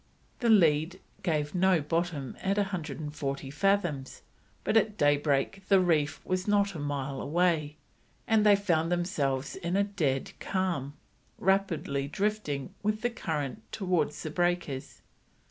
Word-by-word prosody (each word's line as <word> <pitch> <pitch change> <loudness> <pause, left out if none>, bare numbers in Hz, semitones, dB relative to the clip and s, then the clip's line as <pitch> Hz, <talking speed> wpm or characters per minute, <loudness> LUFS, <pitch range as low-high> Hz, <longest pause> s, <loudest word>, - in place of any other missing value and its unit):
The 235 - +1
lead 170 -3 +4 0.2
gave 150 -4 -1
no 185 -1 +4
bottom 155 -3 -2
at 195 +1 0
140 150 -8 -3
fathoms, 175 -5 0 0.4
but - - 0
at 215 -1 +3
daybreak 145 +4 +2
the 195 -1 +6
reef 160 -5 +1
was 185 +1 -1
not 200 -1 +2
a 165 - -6
mile 140 -2 -3
away, 160 -2 +1 0.5
and 220 -2 +3
they 210 -1 +7
found 170 -4 +1
themselves 145 -7 -1
in 175 -1 -2
a 200 - +4
dead 155 -10 -1
calm, 170 -8 -2 0.4
rapidly 175 -8 0
drifting 195 -7 -2
with 215 +1 -1
the 240 +1 0
current 155 - -3
towards 180 -7 -1
the 155 - -4
breakers. 155 -6 -2
170 Hz, 130 wpm, -29 LUFS, 145-195 Hz, 0.5 s, they